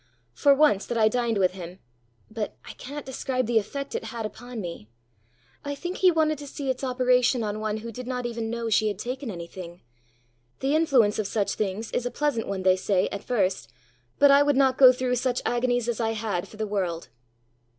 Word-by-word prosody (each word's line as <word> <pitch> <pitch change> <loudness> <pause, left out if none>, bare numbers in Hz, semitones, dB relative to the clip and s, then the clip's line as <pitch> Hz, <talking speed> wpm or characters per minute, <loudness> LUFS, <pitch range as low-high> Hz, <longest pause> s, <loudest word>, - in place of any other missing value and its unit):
For, 280 - +4
once 275 -9 +3
that 240 - -2
I 220 -1 +5
dined 235 -1 0
with 185 -2 +3
him, 180 -1 -9 0.5
but 215 -1 -4
I - - -8
cannot 290 +2 -8
describe 260 -1 -2
the 230 0 +3
effect 275 +7 -6
it - - -3
had 230 -3 -5
upon 245 +3 -7
me! 170 - -7 0.7
I 285 0 -4
think 350 +6 -5
he 370 - +5
wanted 310 -3 +1
to 290 - -8
see 275 -1 -3
its 255 +1 -6
operation 250 -1 +2
on 210 0 -3
one 215 0 -2
who 230 +1 -7
did 250 +2 -8
not 250 -1 -3
even 230 -1 -3
know 235 0 -3
she 220 0 +3
had 205 -2 -2
taken 255 +4 -5
anything. 175 -1 -8 0.8
The 275 +3 +1
influence 260 -11 +3
of 210 - -1
such 205 -1 -1
things 215 +2 -3
is 245 - -1
a - - -2
pleasant 280 -5 -1
one, 195 -1 -3
they 185 0 +4
say, 185 0 +1
at 200 - -5
first, 185 - -1 0.5
but 285 -1 +6
I 280 +1 +7
would 285 -2 +3
not 265 -1 +3
go 260 -2 +10
through 250 0 -1
such 245 0 -1
agonies 245 -1 +1
as 240 -1 -1
I 225 -1 0
had 210 -5 -3
for 215 - -14
the 215 - -2
world!" 185 -5 -3
235 Hz, 215 wpm, -26 LUFS, 205-260 Hz, 0.8 s, go